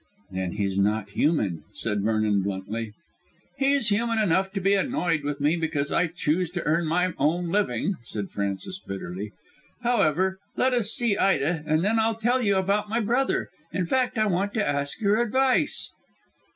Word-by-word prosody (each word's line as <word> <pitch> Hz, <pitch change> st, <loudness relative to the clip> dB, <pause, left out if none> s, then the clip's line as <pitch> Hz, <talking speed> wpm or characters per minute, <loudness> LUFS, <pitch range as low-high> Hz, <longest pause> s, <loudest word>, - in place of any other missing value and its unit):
"Then 95 Hz, -1 st, -3 dB
he's 100 Hz, -1 st, -1 dB
not 100 Hz, 0 st, 0 dB
human," 100 Hz, -, 0 dB
said 105 Hz, -3 st, -2 dB
Vernon 110 Hz, -1 st, +1 dB
bluntly. 100 Hz, +3 st, -4 dB, 0.7 s
"He's 275 Hz, -4 st, +3 dB
human 230 Hz, +2 st, +1 dB
enough 190 Hz, -2 st, +2 dB
to 195 Hz, -, -1 dB
be 195 Hz, +1 st, +2 dB
annoyed 175 Hz, -4 st, +1 dB
with 145 Hz, 0 st, -3 dB
me 150 Hz, +3 st, +2 dB
because 155 Hz, -3 st, -1 dB
I 180 Hz, -, +2 dB
chose 165 Hz, +1 st, -1 dB
to -, -, -1 dB
earn 165 Hz, +2 st, +1 dB
my 180 Hz, +2 st, +1 dB
own 170 Hz, +5 st, +1 dB
living," 190 Hz, -, 0 dB
said 105 Hz, -4 st, -5 dB
Frances 100 Hz, -, -3 dB
bitterly. 95 Hz, -, -6 dB, 0.5 s
"However, 190 Hz, -5 st, +2 dB, 0.2 s
let 255 Hz, 0 st, +3 dB
us 235 Hz, -4 st, +2 dB
see 235 Hz, -5 st, +1 dB
Ida, 165 Hz, -3 st, +2 dB
and 155 Hz, +3 st, +2 dB
then 225 Hz, +2 st, +2 dB
I'll 225 Hz, 0 st, +2 dB
tell 240 Hz, +3 st, +1 dB
you 200 Hz, -4 st, +2 dB
all 190 Hz, -, +3 dB
about 205 Hz, +2 st, 0 dB
my 225 Hz, +2 st, +1 dB
brother. 240 Hz, +5 st, 0 dB, 0.2 s
In 180 Hz, -, -1 dB
fact, 255 Hz, +5 st, 0 dB
I 215 Hz, -, +3 dB
want 200 Hz, +2 st, 0 dB
to 215 Hz, -2 st, +1 dB
ask 140 Hz, +4 st, -1 dB
your 210 Hz, +1 st, +2 dB
advice." 260 Hz, +5 st, +1 dB
175 Hz, 175 wpm, -25 LUFS, -, 0.7 s, He's